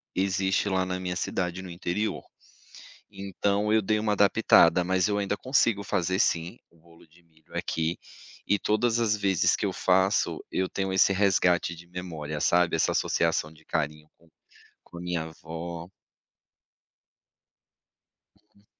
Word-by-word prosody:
existe 95 Hz, +1 st, 0 dB
lá 95 Hz, -1 st, +1 dB
na 90 Hz, 0 st, -3 dB
minha 90 Hz, -1 st, -3 dB
cidade 90 Hz, 0 st, -2 dB
no 95 Hz, -, -9 dB
interior, 90 Hz, +5 st, -3 dB, 0.9 s
então 100 Hz, +1 st, -1 dB
eu 110 Hz, -, +4 dB
dei 105 Hz, +2 st, +1 dB
uma 105 Hz, -1 st, 0 dB
adaptada, 100 Hz, -4 st, +4 dB
mas 95 Hz, +2 st, +1 dB
eu 105 Hz, 0 st, 0 dB
ainda 100 Hz, 0 st, -1 dB
consigo 115 Hz, -5 st, +1 dB
fazer 95 Hz, -1 st, -1 dB
sim 85 Hz, +1 st, 0 dB
o 85 Hz, -, -26 dB
bolo 85 Hz, 0 st, -20 dB
de 85 Hz, +3 st, -24 dB
milho 80 Hz, -2 st, -17 dB
aqui 80 Hz, +1 st, -2 dB, 0.5 s
e 105 Hz, -, +2 dB
todas 115 Hz, +2 st, +1 dB
as 110 Hz, -2 st, +2 dB
vezes 95 Hz, -3 st, +2 dB
que -, -, -4 dB
eu -, -, -2 dB
faço, 95 Hz, +2 st, +1 dB
eu 95 Hz, 0 st, 0 dB
tenho 95 Hz, -1 st, -3 dB
esse 95 Hz, +1 st, +4 dB
resgate 90 Hz, -3 st, +2 dB
de 85 Hz, +1 st, -14 dB
memória, 80 Hz, -4 st, -6 dB
sabe, 85 Hz, +1 st, +3 dB
essa -, -, +1 dB
associação 80 Hz, -2 st, 0 dB
de 80 Hz, -, -21 dB
carinho 75 Hz, +1 st, -3 dB
com 85 Hz, -, -25 dB, 0.6 s
com 85 Hz, -, -11 dB
a -, -, -8 dB
minha 90 Hz, -2 st, -2 dB
avó. 85 Hz, +2 st, -8 dB, 2.7 s
Uhum. 100 Hz, +1 st, -27 dB
90 Hz, 150 wpm, -27 LUFS, 85-100 Hz, 2.7 s, eu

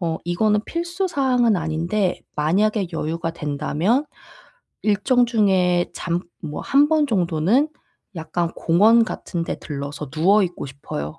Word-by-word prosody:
어 165 Hz, -2 st, -2 dB
이거는 210 Hz, +4 st, +1 dB
필수 345 Hz, +3 st, -2 dB
사항은 250 Hz, -, +2 dB
아닌데 170 Hz, +4 st, -1 dB, 0.2 s
만약에 195 Hz, +6 st, +1 dB
여유가 165 Hz, +1 st, -3 dB
된다면 160 Hz, -, -1 dB, 0.8 s
일정 240 Hz, +4 st, +2 dB
중에 190 Hz, -6 st, +2 dB
잠 170 Hz, 0 st, -2 dB, 0.2 s
뭐 150 Hz, -2 st, -5 dB
1 285 Hz, +2 st, +4 dB
번 310 Hz, -2 st, +3 dB
정도는 190 Hz, -, +2 dB, 0.5 s
약간 165 Hz, +1 st, -2 dB
공원 220 Hz, +7 st, +4 dB
같은 175 Hz, -5 st, -4 dB
데 -, -, -4 dB
들러서 145 Hz, -1 st, -6 dB
누워 195 Hz, +6 st, +3 dB
있고 175 Hz, -5 st, -5 dB
싶어요. 150 Hz, +3 st, -7 dB
180 Hz, 260 characters per minute, -22 LUFS, 160-225 Hz, 0.8 s, 1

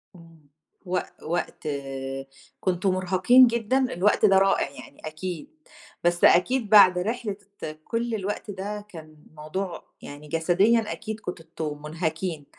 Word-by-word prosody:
امم، 165 Hz, -4 st, -18 dB, 0.4 s
وق 185 Hz, 0 st, -1 dB, 0.2 s
وقت 170 Hz, -1 st, -3 dB, 0.9 s
كنتم 185 Hz, +1 st, 0 dB
مُرهقين 185 Hz, +7 st, +5 dB
جدًا؟ 235 Hz, +1 st, 0 dB, 0.2 s
الوقت 200 Hz, +5 st, +3 dB
ده 195 Hz, -2 st, +6 dB
رائع 195 Hz, -6 st, +3 dB
يعني 140 Hz, 0 st, -13 dB
أكيد، 175 Hz, -, -6 dB, 0.5 s
بس 175 Hz, 0 st, +1 dB
أكيد 220 Hz, +5 st, +4 dB
بعد 190 Hz, -4 st, +8 dB
رحلة 215 Hz, +1 st, -3 dB, 0.5 s
كل 230 Hz, 0 st, -2 dB
الوقت 205 Hz, +1 st, -4 dB
ده، 205 Hz, +2 st, -6 dB
كان 155 Hz, -4 st, -12 dB, 0.2 s
موضوع 170 Hz, +4 st, -5 dB, 0.2 s
يعني 145 Hz, +1 st, -10 dB
جسديًا 190 Hz, +8 st, +2 dB
أكيد 220 Hz, 0 st, -5 dB
كنتم 160 Hz, -6 st, -6 dB
مُنهكين. 160 Hz, 0 st, -3 dB
185 Hz, 120 wpm, -25 LUFS, 165-210 Hz, 0.9 s, بعد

